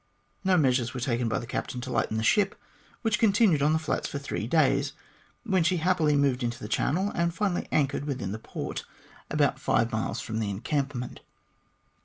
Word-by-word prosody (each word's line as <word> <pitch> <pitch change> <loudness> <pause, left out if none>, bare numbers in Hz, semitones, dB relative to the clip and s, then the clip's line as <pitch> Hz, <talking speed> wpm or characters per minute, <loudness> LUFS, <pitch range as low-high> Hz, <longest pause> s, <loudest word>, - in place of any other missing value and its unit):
No 190 -1 +4
measures 130 -5 +2
were - - -2
taken 120 -1 0
by - - 0
the 120 - -4
captain 125 +1 -4
to 130 +1 -5
lighten 110 - 0
the 110 - -1
ship, 200 - +2 0.4
which 220 -2 +1
continued 200 -8 +4
on 150 +2 +4
the 160 - +3
flats 160 - -2
for - - -4
three 140 -6 -4
days, 140 -1 +2 0.5
when 190 -7 +2
happily 170 -2 +2
she - - +3
moved 135 -2 +2
into 120 0 -2
the 105 - -7
channel, 185 - 0
and 170 0 0
finally 195 -4 -1
anchored 140 -1 +1
within 125 -10 -3
the 110 - -4
port - - -5 0.5
about - - +1
five 115 +1 +1
miles 110 +1 -2
from 110 0 -3
the 105 -2 -1
encampment. 130 +4 -2
140 Hz, 190 wpm, -28 LUFS, 120-170 Hz, 0.5 s, No